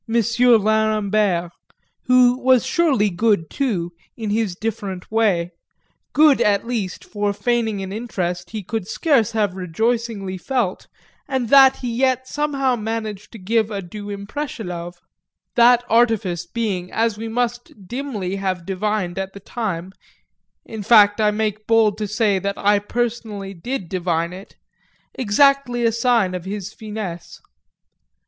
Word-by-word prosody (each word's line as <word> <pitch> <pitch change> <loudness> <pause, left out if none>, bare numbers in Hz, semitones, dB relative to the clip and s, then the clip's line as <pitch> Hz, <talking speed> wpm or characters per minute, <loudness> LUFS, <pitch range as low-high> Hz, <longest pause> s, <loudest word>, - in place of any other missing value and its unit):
Lerambert 215 -5 +2 0.5
who 250 -1 +5
was 255 -3 +4
surely 270 - +2
good 200 -3 +1
too, 195 -11 -1 0.3
in 220 -3 -3
his 210 -4 0
different 200 -3 -5
way; 195 -6 +1 0.6
good 300 -2 +5
at 205 0 +2
least 220 -6 -4
for 205 -1 -1
feigning 220 -1 -1
an 190 0 -6
interest 180 -6 -3
he 215 -2 -5
could 215 0 -4
scarce 245 -8 +1
have 210 -4 +1
rejoicingly 195 +1 -2
felt 235 -3 -2 0.4
and 260 -5 -2
that 270 -1 +7
he 245 -2 -3
yet 260 0 +1
somehow 275 -3 0
managed 220 -2 -5
to 230 - -10
give 220 +2 0
a 205 -2 -4
due 205 +3 -8
impression 205 +1 -5
of: 175 0 -6 0.6
that 240 0 +6
artifice 215 -7 +1
being, 190 -4 -3
as 225 -1 0
we 225 +2 -6
must 240 +1 -2 0.2
dimly 225 -7 -4
have 185 -3 -3
divined 195 -1 -2
at 190 0 -4
the 200 - -9
time 190 -4 -4 0.7
(in 220 -2 -7
fact 205 0 +5
I 210 - +4
make 215 0 -2
bold 220 -2 +3
to 210 - -2
say 205 -1 +1
that 200 +1 -3
I 205 0 +3
personally 215 -3 -3
did 195 +2 -5
divine 170 -1 -1
it,) 190 +2 -11 0.6
exactly 245 +1 +2
a 230 - +4
sign 230 -5 +2
of 180 -1 -5
his 200 +1 -5
finesse. 210 -6 -7
215 Hz, 140 wpm, -21 LUFS, 195-235 Hz, 0.7 s, that